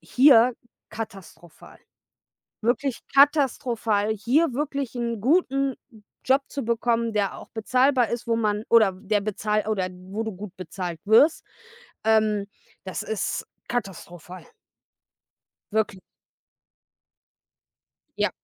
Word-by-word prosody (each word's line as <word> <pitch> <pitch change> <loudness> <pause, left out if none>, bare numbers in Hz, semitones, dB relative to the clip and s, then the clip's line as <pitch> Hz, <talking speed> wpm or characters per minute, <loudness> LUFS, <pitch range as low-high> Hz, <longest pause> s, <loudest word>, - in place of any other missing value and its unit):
hier 250 -2 +5 0.4
katastrophal, 190 -6 -10 0.8
wirklich 245 +2 0
katastrophal, 245 -7 +3
hier 260 +9 +1
wirklich 280 -2 -3
'n 235 -3 -3
guten 275 - +1 0.5
Job 270 +1 +3
zu 280 - -5
bekommen, 230 0 0
der 205 -2 -1
auch - - -13
bezahlbar 250 +2 +2
ist, 235 0 -4
wo 230 -1 +1
man 210 -1 -1
oder 220 -5 +5
der 205 +2 -1
bezahl 210 +1 -1
oder 195 -4 0
wo 185 +4 -6
du 220 - -4
gut 195 0 -9
bezahlt 180 -2 -6
wirst. 225 +10 +4 0.6
Ähm, 215 -2 +2 0.4
das 190 - -4
ist 220 -3 -3 0.2
katastrophal. 185 -5 -6 1.3
Wirkli 205 -3 -1 2.2
Ja. - - +1
220 Hz, 105 wpm, -24 LUFS, 205-255 Hz, 2.2 s, hier